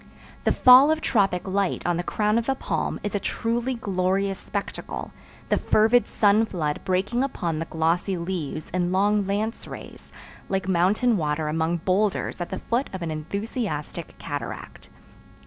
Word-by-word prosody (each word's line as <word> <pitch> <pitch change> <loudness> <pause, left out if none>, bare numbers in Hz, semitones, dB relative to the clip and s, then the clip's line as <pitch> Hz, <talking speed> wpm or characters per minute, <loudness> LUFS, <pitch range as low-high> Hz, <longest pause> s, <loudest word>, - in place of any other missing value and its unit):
The - - +4
fall 255 +3 +8
of 315 0 +2
tropic 195 - +1
light 195 0 -1
on 175 - +1
the - - 0
crown 210 +4 +1
of 235 - -3
a 270 - +2
palm - - -2
is 205 - -3
a 205 - +1
truly 235 +5 -1
glorious 195 -2 0
spectacle, 200 -1 -5 0.4
the - - +2
fervid 225 +3 +3
sun 210 +1 +3
flood 155 -7 -2
breaking 195 +7 0
upon 170 - -2
the 165 - -2
glossy 170 +4 0
leaves 170 -4 -4
in 180 0 0
long 205 +1 +2
lance 215 +3 -2
rays, - - -10 0.4
like 190 -1 -1
mountain 195 +6 +3
water 155 -1 -1
among 160 +2 0
boulders 195 -1 0
at 175 - -3
the 190 - -4
foot 240 +7 -1
of 185 -2 -4
an 165 - -3
enthusiastic 170 - -4
cataract. 145 0 -6
195 Hz, 160 wpm, -25 LUFS, 175-215 Hz, 0.4 s, fall